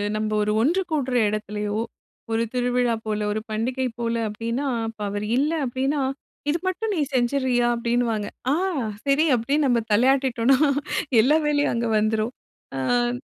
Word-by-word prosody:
நம்ம 215 Hz, 0 st, -1 dB
ஒரு 210 Hz, -, 0 dB
ஒன்று 340 Hz, +10 st, +2 dB
கூடுற 265 Hz, -5 st, 0 dB
இடத்திலேயோ 210 Hz, 0 st, -3 dB, 0.5 s
ஒரு 225 Hz, +1 st, +1 dB
திருவிழா 245 Hz, -1 st, +1 dB
போல 215 Hz, -1 st, -1 dB
ஒரு 215 Hz, -, -1 dB
பண்டிகை 250 Hz, +4 st, -1 dB
போல 230 Hz, 0 st, -1 dB, 0.2 s
அப்டின்னா, 230 Hz, +6 st, -3 dB, 0.2 s
அப்ப 220 Hz, -1 st, -8 dB
அவர் 205 Hz, +1 st, -3 dB
இல்ல 290 Hz, +3 st, +2 dB
அப்டின்னா 270 Hz, +4 st, -1 dB, 0.5 s
இது 320 Hz, -, +2 dB
மட்டும் 425 Hz, +4 st, -1 dB
நீ 325 Hz, -, 0 dB
செஞ்சுறியா 250 Hz, -1 st, +2 dB
அப்டின்னுவாங்க. 235 Hz, -3 st, 0 dB, 0.2 s
ஆ -, -, +4 dB, 0.5 s
சரி, 280 Hz, +3 st, +3 dB
அப்டின்னு 280 Hz, +6 st, +1 dB
நம்ம 245 Hz, -2 st, +3 dB
தலையாட்டிட்டோம்னா 260 Hz, +2 st, +3 dB, 0.6 s
எல்லா 295 Hz, +7 st, +4 dB
வேலையும் 290 Hz, 0 st, +2 dB
அங்க 235 Hz, 0 st, -1 dB
வந்துரும். 215 Hz, +3 st, 0 dB, 0.5 s
அ. 240 Hz, -, +1 dB
245 Hz, 140 wpm, -24 LUFS, 220-270 Hz, 0.6 s, ஆ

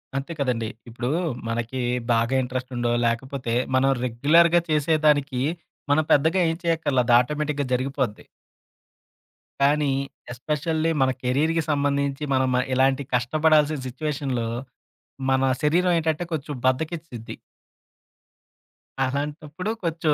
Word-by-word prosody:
అంతే 135 Hz, +4 st, -3 dB
కదండీ! 120 Hz, -5 st, -1 dB, 0.2 s
ఇప్పుడు 120 Hz, +2 st, -4 dB, 0.4 s
మనకి 120 Hz, +3 st, -2 dB, 0.3 s
బాగా 115 Hz, +3 st, +1 dB
ఇంట్రెస్ట్ 130 Hz, +1 st, -4 dB
ఉండో 120 Hz, 0 st, 0 dB
లేకపోతే 120 Hz, +1 st, -2 dB, 0.2 s
మనం 135 Hz, +1 st, +3 dB, 0.2 s
రెగ్యులర్‌గా 165 Hz, +8 st, +4 dB
చేసేదానికి 150 Hz, -3 st, +2 dB, 0.5 s
మనం 155 Hz, +2 st, +4 dB
పెద్దగా 160 Hz, +6 st, +3 dB
ఏం 165 Hz, -, -1 dB
చేయక్కర్లా, 160 Hz, -6 st, +1 dB
అది 120 Hz, -, +4 dB
ఆటోమేటిక్‌గా 150 Hz, +2 st, -1 dB
జరిగిపోద్ది. 130 Hz, -3 st, -2 dB, 1.4 s
కానీ 145 Hz, 0 st, +3 dB, 0.4 s
ఎస్పెషల్లీ 155 Hz, +5 st, -1 dB
మన 130 Hz, 0 st, +4 dB
కెరీర్‌కి 155 Hz, +6 st, +1 dB
సంబంధించి 140 Hz, 0 st, 0 dB
మనం 130 Hz, 0 st, +2 dB
మ -, -, +3 dB, 0.2 s
ఇలాంటి 135 Hz, +1 st, +2 dB
కష్టపడాల్సిన 150 Hz, +4 st, +3 dB
సిట్యుయేషన్‌లో 135 Hz, -3 st, -3 dB, 0.8 s
మన 130 Hz, 0 st, +2 dB, 0.2 s
శరీరం 175 Hz, +4 st, +3 dB
ఏంటంటే 160 Hz, +1 st, -1 dB
కొంచెం 150 Hz, -1 st, -4 dB
బద్ధకిచ్చిద్ది. 140 Hz, -2 st, -2 dB, 1.7 s
అలాంటప్పుడు 150 Hz, +7 st, -3 dB
కొంచెం 165 Hz, -2 st, +1 dB
140 Hz, 105 wpm, -24 LUFS, 130-155 Hz, 1.7 s, రెగ్యులర్‌గా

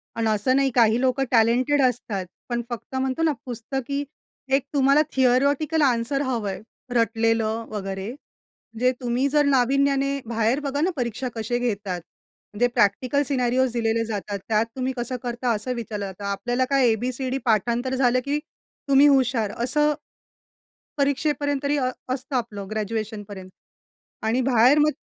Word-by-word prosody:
आणि 230 Hz, -1 st, 0 dB
असं 215 Hz, +5 st, +2 dB
नाही 275 Hz, 0 st, +3 dB
काही 230 Hz, -1 st, +4 dB
लोकं 260 Hz, +1 st, +2 dB
टॅलेंटेड 250 Hz, +5 st, +3 dB
असतात. 230 Hz, -7 st, 0 dB, 0.2 s
पण 240 Hz, -1 st, -1 dB
फक्त 240 Hz, +2 st, -7 dB
म्हणतो 260 Hz, +3 st, -1 dB
ना 320 Hz, -, +3 dB
पुस्तकी 265 Hz, +3 st, -3 dB, 0.5 s
एक 270 Hz, -1 st, +3 dB
तुम्हाला 280 Hz, +1 st, +4 dB
थियोरेटिकल 280 Hz, +5 st, +2 dB
आन्सर 260 Hz, 0 st, +1 dB
हवं 240 Hz, -7 st, -1 dB
आहे 190 Hz, 0 st, -5 dB, 0.3 s
रटलेलं 225 Hz, -1 st, +1 dB
वगैरे 195 Hz, -2 st, -4 dB
म्हणजे 250 Hz, -2 st, -5 dB
तुम्ही 245 Hz, +2 st, +1 dB
जर 295 Hz, +1 st, +3 dB
नाविन्याने 275 Hz, +1 st, +2 dB
बाहेर 230 Hz, +3 st, +1 dB
बघा 285 Hz, 0 st, -2 dB
ना 345 Hz, -, +2 dB
परीक्षा 245 Hz, -1 st, -3 dB
कशी 230 Hz, +2 st, -1 dB
घेतात? 200 Hz, -7 st, -2 dB, 0.5 s
म्हणजे 240 Hz, +4 st, +2 dB
प्रॅक्टिकल 245 Hz, +5 st, +1 dB
सिनेरिओस 255 Hz, -1 st, +1 dB
दिलेले 230 Hz, -1 st, 0 dB
जातात. 205 Hz, -2 st, -4 dB
त्यात 220 Hz, 0 st, +2 dB
तुम्ही 260 Hz, 0 st, -2 dB
कसं 245 Hz, +1 st, -3 dB
करता 240 Hz, 0 st, -1 dB
असं 215 Hz, +5 st, -3 dB
विचारलं 215 Hz, -3 st, -4 dB
जातं. 195 Hz, +1 st, -8 dB
आपल्याला 245 Hz, +6 st, -1 dB
काय 275 Hz, -3 st, +4 dB
ए-बी-सी-डी 255 Hz, +3 st, -2 dB
पाठांतर 240 Hz, +3 st, +1 dB
झालं, 255 Hz, -1 st, +3 dB
की 290 Hz, +1 st, 0 dB, 0.5 s
तुम्ही 275 Hz, +1 st, +7 dB
हुशार, 255 Hz, -6 st, +2 dB
असं 300 Hz, +4 st, +2 dB, 1.0 s
परीक्षेपर्यंत 285 Hz, 0 st, 0 dB
तरी 285 Hz, +1 st, +1 dB
असतं 260 Hz, 0 st, -3 dB
आपलं 210 Hz, -5 st, -3 dB
ग्रॅज्युएशनपर्यंत 210 Hz, -3 st, -4 dB, 0.8 s
आणि 230 Hz, +4 st, +2 dB
बाहेर 255 Hz, +2 st, +5 dB
मग 300 Hz, +1 st, +4 dB
245 Hz, 140 wpm, -24 LUFS, 225-270 Hz, 1.0 s, तुम्ही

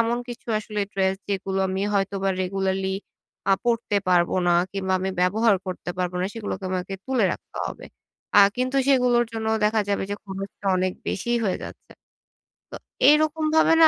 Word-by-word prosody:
এমন 230 Hz, +1 st, +1 dB
কিছু 240 Hz, 0 st, -8 dB
আসলে 210 Hz, 0 st, -4 dB
ড্রেস 190 Hz, 0 st, +1 dB
যেগুলো 195 Hz, -1 st, -2 dB
আমি 190 Hz, +1 st, -1 dB
হয়তোবা 195 Hz, 0 st, 0 dB
রেগুলারলি 190 Hz, 0 st, -1 dB, 0.6 s
আ -, -, +7 dB
পরতে 230 Hz, -3 st, +1 dB
পারব 175 Hz, -1 st, +4 dB, 0.2 s
না 175 Hz, -, +4 dB, 0.2 s
কিংবা 190 Hz, -1 st, -2 dB
আমি 190 Hz, +1 st, -1 dB
ব্যবহার 205 Hz, +3 st, +3 dB
করতে 180 Hz, -1 st, -4 dB
পারবো 180 Hz, 0 st, -1 dB
না। 185 Hz, -, +1 dB
সেগুলোকে 205 Hz, -3 st, -5 dB
আমাকে 185 Hz, +1 st, -3 dB
তুলে 255 Hz, -6 st, +2 dB
রাখতে -, -, -10 dB
হবে। -, -, -8 dB, 0.5 s
আ -, -, +10 dB, 0.2 s
কিন্তু 255 Hz, +2 st, 0 dB
সেগুলোর 250 Hz, -3 st, +4 dB
জন্যও 220 Hz, 0 st, 0 dB
দেখা 215 Hz, +1 st, +3 dB
যাবে 200 Hz, -, 0 dB
যে, -, -, 0 dB
খরচটা 195 Hz, +1 st, -7 dB
অনেক 185 Hz, 0 st, 0 dB, 0.2 s
বেশিই 240 Hz, +5 st, 0 dB
হয়ে 190 Hz, -, 0 dB
যাচ্ছে। -, -, -11 dB, 0.2 s
তো -, -, -91 dB, 1.0 s
এরকমভাবে 310 Hz, +1 st, +3 dB
না 320 Hz, -, +10 dB
200 Hz, 165 wpm, -24 LUFS, 190-235 Hz, 1.0 s, আ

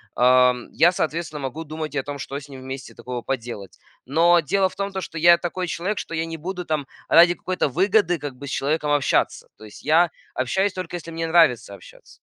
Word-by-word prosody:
ам, 125 Hz, 0 st, +4 dB
я, 175 Hz, +2 st, +4 dB
соответственно, 160 Hz, -2 st, -3 dB
могу 140 Hz, +5 st, -5 dB
думать 155 Hz, 0 st, -6 dB
и -, -, +1 dB
о -, -, -3 dB
том, 145 Hz, 0 st, -6 dB
что 140 Hz, 0 st, -7 dB
с 145 Hz, 0 st, -14 dB
ним 135 Hz, -1 st, -10 dB
вместе 130 Hz, 0 st, -8 dB
такого 125 Hz, -1 st, -6 dB
поделать. 115 Hz, -6 st, -5 dB, 0.3 s
Но 170 Hz, +5 st, +4 dB
дело 190 Hz, +6 st, +1 dB
в -, -, -16 dB
том, 200 Hz, 0 st, -3 dB
то 190 Hz, 0 st, -4 dB
что 165 Hz, -, -7 dB
я 170 Hz, +1 st, +7 dB
такой 180 Hz, +1 st, -4 dB
человек, 195 Hz, +6 st, -2 dB
что 165 Hz, -, -6 dB
я 160 Hz, -, -1 dB
не 165 Hz, 0 st, -6 dB
буду 180 Hz, +2 st, -5 dB
там 150 Hz, -3 st, -2 dB, 0.2 s
ради 175 Hz, +1 st, +7 dB
какой-то 185 Hz, -4 st, -1 dB
выгоды 185 Hz, -, +2 dB
как 145 Hz, -2 st, -6 dB
бы 140 Hz, -, -8 dB
с -, -, -5 dB
человеком 150 Hz, +2 st, -1 dB
общаться. 145 Hz, -1 st, +1 dB
То 110 Hz, -, -13 dB
есть 105 Hz, -, -13 dB
я 165 Hz, +2 st, +4 dB, 0.2 s
общаюсь, 190 Hz, +10 st, 0 dB
только 185 Hz, -2 st, -5 dB
если 165 Hz, -1 st, -7 dB
мне 165 Hz, 0 st, -3 dB
нравится 160 Hz, -11 st, +3 dB
общаться. -, -, -17 dB
160 Hz, 220 wpm, -23 LUFS, 135-175 Hz, 0.3 s, я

